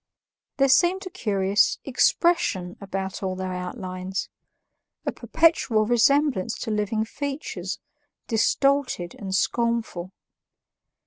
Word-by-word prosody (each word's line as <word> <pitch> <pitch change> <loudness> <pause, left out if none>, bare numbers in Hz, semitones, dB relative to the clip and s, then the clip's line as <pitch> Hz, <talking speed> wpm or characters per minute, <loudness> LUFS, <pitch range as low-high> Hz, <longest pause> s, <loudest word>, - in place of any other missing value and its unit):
There 275 -1 +4
seemed 355 +8 +3
a 370 - -6
curious 200 - +2
EXPRESSION 245 - +1
about 190 -1 -4
all 190 -1 -2
their 185 0 -4
outlines 185 0 -4 0.8
a - - 0
perpetual 270 -10 +2
resemblance 245 -1 +2
to 225 - -3
living 215 +1 0
features, 285 +5 -4 0.5
distorted 255 -4 +1
and 190 -2 -3
scornful. 230 -5 0
215 Hz, 100 wpm, -25 LUFS, 190-275 Hz, 0.8 s, There